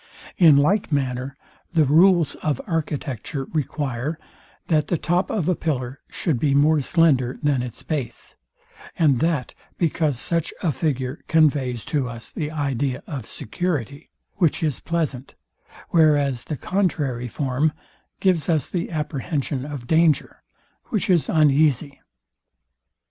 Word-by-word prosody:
In 160 -6 +7
like 180 +7 +2
manner 130 -1 -2 0.4
the 160 -3 +4
rules 170 +2 +5
of 150 -4 -1
architecture 145 - -3
require, 145 -1 -2 0.5
that 155 -3 +1
the 175 - 0
top 175 +5 0
of 185 -7 -1
a 185 - +3
pillar 130 -6 -3
should 155 -9 -1
be 140 0 +2
more 150 +1 +4
slender 135 -5 +2
than 145 -3 +2
its 125 -2 -6
base, 145 -6 -4 0.6
and 150 -8 +3
that 160 -6 0 0.2
because 155 -5 0
such 165 +2 0
a 170 - +2
figure 135 -3 -2
conveys 140 -7 +2
to 140 -5 -1
us 115 -1 -8
the 150 -2 -3
idea 140 -4 -2
of 130 -9 -6
security, 145 - -4 0.3
which 165 -2 +1
is 150 -5 0
pleasant; 150 -6 -3 0.5
whereas 145 -6 +3
the 150 - -4
contrary 145 -11 -1
form 140 +4 0 0.5
gives 180 -6 +1
us 155 -4 +1
the 175 -2 -2
apprehension 145 -3 -3
of 145 -4 -6
danger, 160 +2 +2 0.4
which 205 -3 0
is 170 -4 +2
uneasy. 145 -2 +2
150 Hz, 130 wpm, -23 LUFS, 130-160 Hz, 0.6 s, In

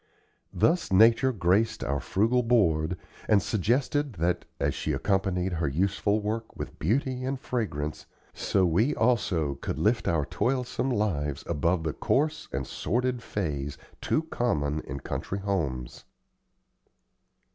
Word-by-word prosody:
Thus 170 - +2
Nature 115 +6 +6
graced 105 +2 +1
our 70 +2 -1
frugal 115 - +2
board, 90 -8 +2 0.3
and 105 - +6
suggested 125 - 0
that, 85 -1 0
as - - +1
she - - -2
accompanied 95 -2 0
her 80 -3 0
useful 100 +7 +1
work 110 +2 -4
with - - -7
beauty 130 - 0
and 135 +1 -2
fragrance, 75 - -3 0.3
so 95 -2 +1
we 105 - +2
also 90 - +1
could 70 - -5
lift 105 +9 +1
our 80 -4 +1
toilsome 125 - -1
lives 80 - -1
above 85 +2 0
the 80 -2 -1
coarse 150 +3 0
and 70 +1 -2
sordid 125 - -1
phase 75 -11 -3 0.2
too 155 - +1
common 75 - -1
in 65 +1 -5
country 95 - -4
homes. 80 -12 -3
100 Hz, 130 wpm, -28 LUFS, 80-120 Hz, 0.3 s, Nature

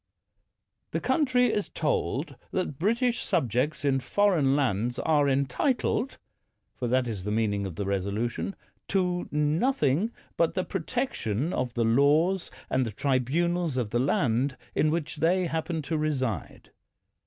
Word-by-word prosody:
The - - -1
country 255 -5 +2
is 205 - -1
told - - -1
that 180 -7 -3
British 235 +6 +1
subjects 145 - 0
in 135 -1 +3
foreign 150 0 +2
lands 120 -4 0
are 145 -3 +2
entitled 140 - 0 0.3
— - - -50
for 125 - -3
that 125 +1 +2
is 105 -5 -4
the 105 - -3
mean 110 -1 +1
ing 100 -1 -2
of 90 - -8
the 100 - -3
resolution 100 - -2 0.2
— - - -44
to 180 -2 0
nothing 155 - +1 0.3
but 165 - +2
the 185 - +1
pro 190 - -3
tection 165 - -2
of 125 -1 -2
the 115 -1 +2
laws 150 +10 +3 0.2
and 130 0 +1
the 115 - -3
tribunals 145 - 0
of 115 -5 -1
the 120 - +1
land 130 0 +1 0.2
in 155 - +2
which 155 -1 -2
they 180 +4 +2
happen 160 0 -2
to 160 +2 -1
reside. 130 -8 -2
145 Hz, 155 wpm, -27 LUFS, 120-180 Hz, 0.3 s, in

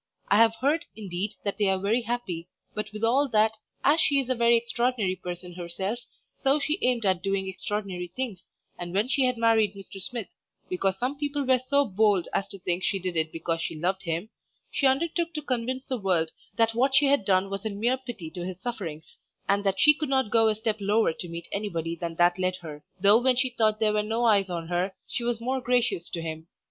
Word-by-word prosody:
I 200 - +5
have 225 0 +5
heard, 290 +8 +1
indeed, 200 0 -4
that 200 +1 -3
they 205 - +3
are 190 0 +2
very 205 +6 +1
happy; 220 -8 -3 0.3
but 210 0 -4
withal 230 +7 +2
that, 220 +1 +3 0.3
as 295 +4 +5
she 280 -1 +4
is 260 -1 -1
a - - +4
very 235 -1 +4
extraordinary 235 -4 0
person 180 -1 -7
herself, 185 +6 -3 0.4
so 275 +2 +2
she 300 +5 -1
aimed 245 -3 +1
at 185 -2 +2
doing 195 0 -1
extraordinary 190 -1 -4
things, 235 -9 -4 0.3
and 175 +1 -5
when 210 +4 +2
she 265 0 +2
had 250 -1 +1
married 225 -3 +3
Mr. 195 0 -10
Smith 225 +2 -4 0.4
(because 190 +1 0
some 260 +6 -2
people 290 -1 -1
were 260 0 +4
so 280 +3 +2
bold 205 -4 +2
as 195 - 0
to 195 - -9
think 180 0 -2
she 195 - +1
did 185 -2 -3
it 160 -1 0
because 165 0 -2
she 165 - -3
loved 185 +3 0
him) 170 +4 -3 0.4
she 275 - +2
undertook 330 +4 0
to 305 - -2
convince 255 0 -2
the 255 -2 -2
world 175 -5 +1 0.2
that 225 -1 +3
what 265 +4 +2
she 290 - +6
had 275 -5 +3
done 195 0 +2
was 195 0 -4
in 205 -2 -4
mere 245 +4 +2
pity 225 -11 -7
to 175 -1 -6
his 180 0 -6
sufferings, 185 -9 -6 0.3
and 200 +1 +2
that 195 -1 0
she 300 - +7
could 305 -1 -4
not 265 -5 +1
go 225 -1 +5
a 215 - +2
step 220 0 -1
lower 205 -2 +2
to 175 - -6
meet 170 0 -7
anybody 170 -5 -2
than 170 0 -5
that 175 +2 +3
led 185 0 +1
her, 150 -2 -8 0.2
though 205 +4 +6
when 255 0 +3
she 255 +1 +1
thought 215 -2 +1
there 215 -1 +3
were 210 - +2
no 225 +3 -1
eyes 200 -4 +4
on 170 -2 -4
her, 180 +2 -1
she 240 - -3
was 235 -1 0
more 260 +3 -1
gracious 245 -8 +1
to 165 - -4
him. 160 0 -6
210 Hz, 225 wpm, -27 LUFS, 185-245 Hz, 0.4 s, she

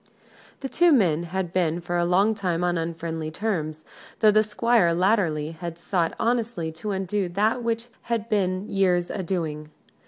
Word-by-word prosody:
The 270 - -3
two 345 +5 +4
men 175 - +3
had 180 0 -3
been 175 -2 +1
for 175 0 -4
a 175 0 +2
long 195 +5 +3
time 180 -5 -1
on 175 0 +1
unfriendly 165 -1 -3
terms, 155 -4 -3 0.3
though 215 -1 +5
the 215 +1 +5
Squire 215 -4 +2
latterly 175 -5 +1
had 165 +1 -7
sought 170 -1 -1
honestly 230 -8 -1
to 165 +7 -6
undo 195 -1 -1
that 210 +7 +1
which 230 0 -1 0.2
had 230 -2 -1
been 190 -2 0
years 180 -3 +1
a 195 - -3
doing. 160 -4 -3
180 Hz, 165 wpm, -25 LUFS, 165-215 Hz, 0.3 s, though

